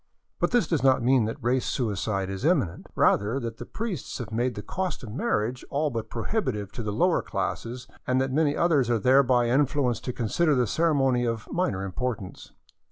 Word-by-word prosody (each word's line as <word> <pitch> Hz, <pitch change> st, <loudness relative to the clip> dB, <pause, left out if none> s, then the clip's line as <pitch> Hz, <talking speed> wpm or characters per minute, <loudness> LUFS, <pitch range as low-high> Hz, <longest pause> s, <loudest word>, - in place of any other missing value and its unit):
But -, -, +2 dB
this 245 Hz, -1 st, +3 dB
does 165 Hz, -5 st, 0 dB
not 130 Hz, -2 st, +4 dB
mean 125 Hz, -2 st, +4 dB
that 110 Hz, -, -3 dB
race 125 Hz, +1 st, +2 dB
suicide 100 Hz, -4 st, -1 dB
is 95 Hz, +3 st, -5 dB
imminent; 145 Hz, -, +1 dB
rather 105 Hz, +6 st, +2 dB
that 115 Hz, -3 st, -5 dB
the -, -, -8 dB
priests 215 Hz, -, -4 dB
have -, -, -6 dB
made 120 Hz, +2 st, 0 dB
the 105 Hz, -, -6 dB
cost 185 Hz, -6 st, -3 dB
of 115 Hz, -, -7 dB
marriage 125 Hz, -, -1 dB
all 150 Hz, +1 st, 0 dB
but 115 Hz, -2 st, -4 dB
pro 115 Hz, -, -4 dB
hibitive 110 Hz, -, -2 dB
to -, -, -6 dB
the 105 Hz, -2 st, -3 dB
lower 170 Hz, -, +2 dB
classes, 115 Hz, +5 st, -4 dB, 0.2 s
and 130 Hz, 0 st, +2 dB
that 135 Hz, 0 st, 0 dB
many 150 Hz, 0 st, +2 dB
others 150 Hz, -8 st, +3 dB
are 120 Hz, -, +3 dB
thereby 125 Hz, +1 st, +4 dB
in 130 Hz, +4 st, +3 dB
fluenced 130 Hz, -4 st, 0 dB
to 125 Hz, -, -1 dB
consider 145 Hz, +7 st, +1 dB
the 125 Hz, -1 st, +2 dB
ceremony 135 Hz, -2 st, +2 dB
of 115 Hz, -2 st, -2 dB
minor 100 Hz, -, -1 dB
importance. 110 Hz, 0 st, -5 dB
125 Hz, 200 wpm, -26 LUFS, 110-145 Hz, 0.2 s, not